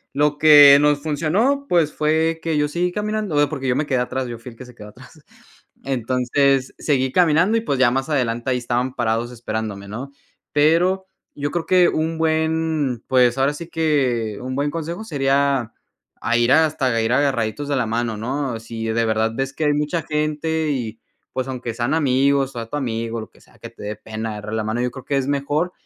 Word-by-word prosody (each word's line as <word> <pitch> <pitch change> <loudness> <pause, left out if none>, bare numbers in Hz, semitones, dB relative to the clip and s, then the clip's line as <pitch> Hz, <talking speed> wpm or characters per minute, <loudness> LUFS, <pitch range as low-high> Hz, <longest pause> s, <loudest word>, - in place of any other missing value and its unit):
Lo 145 0 +2
que 145 -2 +9
nos 145 0 +2
funcionó, 180 - 0
pues, 170 - +2
fue 160 +2 +1
que 160 -2 0
yo 150 0 +2
seguí 175 +4 -1
caminando, 210 -5 -1
eh, 145 - +3
porque 135 -3 -4
yo 125 - +2
me 150 - 0
quedé 130 -3 +1
atrás, 130 +1 -2
yo 120 -1 -6
fuí 120 +2 -10
el 115 - -17
que 130 - -10
se 125 -1 -15
quedó 105 -2 -11
atrás. - - -17 0.6
Entonces, 130 +1 0
seguí 130 -3 0
caminando, 180 +6 +3
y 225 - 0
pues, 140 - -2
ya 130 -2 +5
más 135 +5 -2
adelante 120 -3 -1
ahí 125 - +1
estaban 125 +1 -2
parados 120 0 -1
esperándome, 110 -4 -5
¿no? 125 +7 -7 0.4
Pero, 175 +6 +2 0.3
yo 145 0 -2
creo 170 -2 -2
que 180 -1 +4
un 160 +1 -1
buen, 160 -5 0
pues 125 -1 +3
ahora 135 +2 +2
sí 170 +3 -8
que, 130 -10 0
un 130 +1 -4
buen 140 +2 0
consejo 170 +4 -5
sería 140 - 0 0.5
a 120 +1 +1
ir 120 +2 +2
hasta 135 -6 +2
ir 115 +2 0
agarraditos 135 0 0
de 140 - +1
la 125 - +1
mano, 115 0 -2
¿no? 130 +1 -3
Si 115 0 -6
de 115 +1 +1
verdad 110 0 +1
ves 135 +2 -3
que 160 - -4
hay 150 -1 +3
mucha 150 +3 -1
gente, 155 +1 -1
y 115 -5 -4 0.3
pues, 130 0 -2
aunque 125 -3 -5
sean 120 +4 -1
amigos, 135 -2 +2
o 120 - -4
a 115 - -7
tu - - -5
amigo, 115 -3 -3
lo - - -10
que - - -23
sea - - -23
que - - -9
te - - -16
dé 105 +1 -4
pena 110 +1 -6
agarrar 105 +1 -7
la 110 -1 -1
mano, 110 +3 -2
yo 125 0 -1
creo 130 0 -11
que 140 - 0
es 135 - 0
mejor 145 +5 -1
135 Hz, 210 wpm, -21 LUFS, 120-155 Hz, 0.6 s, que